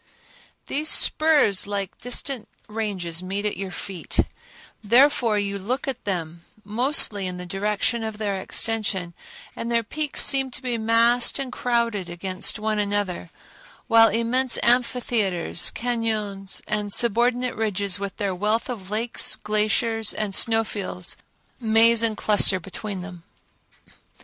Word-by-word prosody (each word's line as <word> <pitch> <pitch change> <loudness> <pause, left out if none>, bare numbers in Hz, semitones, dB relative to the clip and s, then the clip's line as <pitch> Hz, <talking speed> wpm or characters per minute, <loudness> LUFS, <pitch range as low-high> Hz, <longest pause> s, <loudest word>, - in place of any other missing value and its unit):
These 305 +3 -2
spurs 295 -12 +3
like 200 -2 -3
distinct 245 -1 -4 0.2
ranges 195 -6 -3
meet 195 +3 -4
at 210 - -1
your 195 0 -5
feet; 185 -1 -2 0.6
therefore 235 0 +4
you 200 -1 -2
look 255 +9 -3
at 270 - -4
them 170 -4 -3 0.2
mostly 215 - +3
in 180 0 -5
the 180 - -6
direction 210 +5 -1
of 220 -1 -5
their 200 -3 -2
extension, 205 -5 0 0.4
and 230 - -5
their 235 -1 +1
peaks 295 +6 +1
seem 270 -1 +3
to 255 - -8
be 245 -2 -2
massed 230 +2 +3
and 270 -2 -4
crowded 235 -7 -1
against 185 +3 -2
one 215 0 -1
another, 205 -4 -2 0.6
while 225 -1 +6
immense 235 +3 +1
amphitheaters, 235 -8 +1
cañons 215 -5 -2
and 210 -1 -2
subordinate 240 +3 +2
ridges 200 -3 -1
with 200 -2 -5
their 200 -2 -1
wealth 210 +7 -1
of 195 -6 -8
lakes, 225 +3 +1
glaciers, 215 +1 0
and 210 -2 -2
snow 225 +2 +3
fields, 190 -4 -3 0.4
maze 225 0 +4
and 225 -2 +1
cluster 205 -3 +2
between 195 +2 -6
them. 180 -2 -9
215 Hz, 135 wpm, -23 LUFS, 195-235 Hz, 0.6 s, while